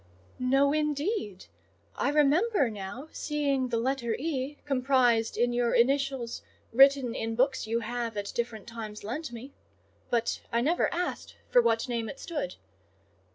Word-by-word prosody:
"No, 270 +3 +3
indeed! 300 - -1 0.5
I - - 0
remember 300 - +3
now 215 +9 -7
seeing 285 -3 -1
the 235 -1 -1
letter 235 -1 0
E. 290 -1 -3
comprised 255 -4 +2
in 240 0 +2
your 240 -1 +1
initials 270 -1 +1 0.3
written 270 -1 +6
in 225 -1 -3
books 260 -1 +1
you 230 +1 0
have 230 -1 -3
at 200 0 -3
different 230 -3 -3
times 220 -2 -7
lent 255 +6 -4
me; 240 +4 -9 0.6
but 235 -1 0
I 235 - +2
never 320 +8 +2
asked 355 +1 -3 0.2
for 245 - +7
what 230 0 +1
name 230 -3 -2
it - - -8
stood. 290 - -4
255 Hz, 145 wpm, -29 LUFS, 230-280 Hz, 0.6 s, for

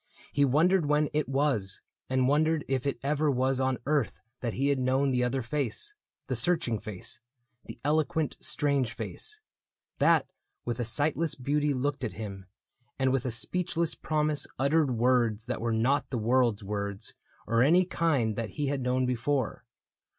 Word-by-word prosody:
He 145 0 +4
wondered 160 +5 +3
when 150 0 +2
It 150 -2 0
was, 135 -9 0 0.3
and 130 -1 +2
wondered 155 +2 +2
if 135 0 -1
it 140 - -1
ever 150 +2 +1
was 130 0 +1
On 130 -1 +1
earth 145 0 0 0.2
that 120 -3 -3
he 140 +2 +1
had 140 -2 +2
known 130 +2 +2
the 125 -1 +2
other 125 +1 0
face 140 - -2 0.2
— - - -58
The - - -1
searching 160 -11 +1
face, 105 +1 -6 0.5
the - - -9
eloquent, 155 0 +1
strange 140 -4 0
face 430 0 -7 0.3
— - - -52
That - - +4 0.4
with 120 0 -2
a 120 - 0
sightless 150 +6 0
beauty 145 +3 0
looked 140 +1 -1
at 120 - -2
him 100 -3 -7 0.5
And 130 -1 +2
with 135 -1 0
a - - +1
speechless 165 +7 -1
promise 150 -1 -1
uttered 145 +2 +3
words 120 -3 +2
That 125 -2 -3
were 115 0 0
not 120 +6 +1
the 125 - -2
world's 120 -2 +2
words, 100 0 -3 0.3
or 115 +2 +2
any 175 +8 +5
kind 145 - +1
That 115 -1 -3
he 150 - 0
had 140 -1 -1
known 125 +1 +1
before. 125 +1 -1
135 Hz, 170 wpm, -29 LUFS, 120-150 Hz, 0.5 s, any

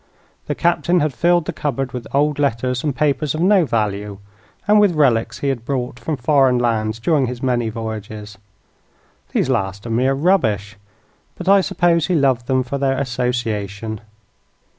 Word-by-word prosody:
The - - -2
Captain 175 +1 +1
had 150 -3 0
filled 175 +4 +2
the - - -4
cupboard 135 -3 -3
with 125 -1 -6
old 145 +1 +1
letters 125 -2 0
and 145 -4 -1
papers 150 0 0
of - - -4
no 190 -1 +4
value, 105 -3 -2 0.5
and 210 0 +5
with 200 -5 +3
relics 125 -7 +1
he - - +2
had 125 -4 -2
brought 125 -2 -3
from 155 -3 -3
foreign 130 -1 +3
lands 115 -2 0
during 135 +3 +1
his 125 +1 -6
many 120 -3 0
voyages. 110 -2 -7 0.9
These - - +1
last 95 +2 -2
are 115 - -4
mere 130 +4 +2
rubbish, 110 - +1 0.6
but 180 - -8
I 200 0 +6
suppose 170 -3 +1
he 180 - +1
loved 130 -5 +1
them 130 -1 +1
for 140 +3 -4
their 135 -1 +1
association. 115 -5 -3
130 Hz, 165 wpm, -19 LUFS, 115-150 Hz, 0.9 s, I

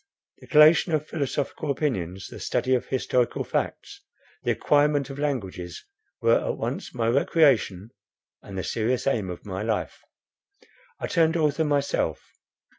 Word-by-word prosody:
The - - -15
collation 155 +2 +6
of 155 -1 +1
philosophical 145 0 -3
opinions, 95 - -2
the - - -10
study 130 - 0
of 125 - 0
historical 125 -2 0
facts, 405 0 -3 0.4
the - - -2
acquirement 145 -1 +2
of 135 - -8
languages, 100 -12 -4 0.4
were - - +3
at - - -2
once - - -4
my 115 -2 0
recreation, 120 - +2 0.5
and 95 - -9
the 95 - -2
serious 120 +2 -1
aim 110 -9 0
of 90 +3 -8
my 95 -1 -4
life. 110 0 -2 1.0
I - - -3
turned 165 -3 +2
author 155 0 +1
myself. 145 -1 0
135 Hz, 140 wpm, -25 LUFS, 110-150 Hz, 1.0 s, collation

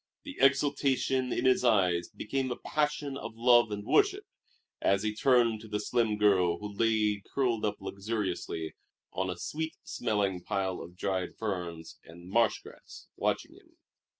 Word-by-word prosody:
The 285 -2 -8
exultation 135 -2 +2
in - - -1
his 130 -1 +4
eyes 90 -7 +3
became 135 +3 -3
a 125 - -2
passion 150 -1 -1
of 110 - -7
love 120 0 +5
and 105 0 -5
worship, - - +3 0.6
as 100 +1 +2
he 105 0 0
turned 115 -2 +3
to 110 - -11
the 105 -1 -2
slim 110 0 0
girl 95 -5 +3
who 105 +2 -7
lay 110 -2 +2
curled 120 -5 +1
up 105 -1 0
luxuriously 100 -5 -3 0.4
on 95 0 -1
a 90 - -4
sweet 160 - -4
smelling 100 -6 -1
pile 95 -1 -2
of 90 +1 -11
dried 95 -2 -2
ferns 90 -6 -5
and 85 +2 -13
marsh 115 +1 +2
grass, - - -13
watching - - -1
him. - - -21
105 Hz, 155 wpm, -30 LUFS, 95-125 Hz, 0.6 s, love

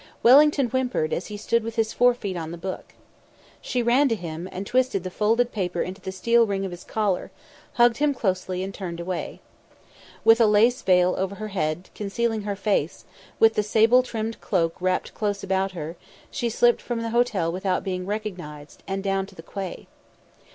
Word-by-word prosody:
Wellington 280 +1 +6
whimpered 250 -11 -1
as 175 - -3
he 210 - -6
stood 230 +2 0
with 230 0 -5
his 225 -1 0
fore 245 0 +4
feet 200 -6 -5
on 165 -2 -4
the 170 - -7
book. 185 +3 -7 0.7
She 250 -1 -1
ran 260 +4 +4
to 225 - +1
him 170 -1 -6
and 190 +2 -5
twisted 250 -5 +1
the 185 - -5
folded 230 +5 +1
paper 180 -4 -2
into 190 +2 -7
the 190 - -5
steel 230 +5 +3
ring 195 -1 -2
of 190 - -5
his 175 0 -9
collar, 205 -4 -1 0.4
hugged 240 -1 +4
him 295 0 +2
closely, 185 -4 -1
and 195 +1 -5
turned 175 -4 -6
away. 175 0 -5 0.8
With 225 +1 +6
a 225 - +6
lace 225 +4 +4
veil 180 -1 +4
over 190 +1 -2
her 215 +1 -6
head, 175 -2 -3
concealing 220 +2 -2
her 205 -1 -3
face, 195 -6 -1 0.3
with 225 0 +5
the 210 - +1
sable 225 +4 +4
trimmed 225 -2 -5
cloak 165 -4 0
wrapped 185 0 -1
close 205 -2 -2
about 190 0 0
her, 165 0 -6 0.3
she 240 -4 -1
slipped 240 +1 +3
from 235 -2 -3
the 230 - -3
hotel 225 -8 +1
without 185 +1 -1
being 185 -1 -3
recognised, 180 -9 -6
and 195 0 -3
down 195 -1 0
to 195 - -16
the 165 - -11
quay. 190 +1 -6
200 Hz, 195 wpm, -24 LUFS, 185-230 Hz, 0.8 s, Wellington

